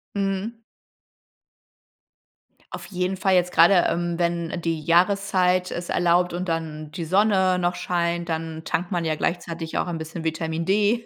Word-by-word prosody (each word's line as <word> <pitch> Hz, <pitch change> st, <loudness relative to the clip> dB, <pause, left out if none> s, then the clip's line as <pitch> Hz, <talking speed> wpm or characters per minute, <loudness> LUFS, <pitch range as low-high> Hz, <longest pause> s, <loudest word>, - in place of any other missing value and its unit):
Mhm. 195 Hz, +2 st, -1 dB, 2.2 s
Auf -, -, -9 dB
jeden 185 Hz, 0 st, -2 dB
Fall 190 Hz, 0 st, +2 dB
jetzt 180 Hz, 0 st, +2 dB
grade, 175 Hz, +2 st, +5 dB
ähm, 175 Hz, 0 st, -1 dB
wenn 170 Hz, -1 st, -1 dB
die 165 Hz, -2 st, -2 dB
Jahreszeit 185 Hz, +1 st, +2 dB
es 175 Hz, 0 st, -5 dB
erlaubt 175 Hz, 0 st, +2 dB
und 180 Hz, 0 st, -3 dB
dann 155 Hz, -2 st, -4 dB
die 165 Hz, +2 st, -5 dB
Sonne 190 Hz, 0 st, +3 dB
noch 175 Hz, 0 st, 0 dB
scheint, 170 Hz, -1 st, -1 dB
dann 160 Hz, 0 st, -4 dB
tankt 175 Hz, +2 st, -2 dB
man 175 Hz, -3 st, -1 dB
ja 160 Hz, -, +1 dB
gleichzeitig 165 Hz, 0 st, -3 dB
auch -, -, 0 dB
ein 170 Hz, -2 st, -4 dB
bisschen 160 Hz, +1 st, -6 dB
Vitamin 160 Hz, 0 st, -2 dB
D 210 Hz, +4 st, +2 dB
175 Hz, 150 wpm, -24 LUFS, 165-185 Hz, 2.2 s, grade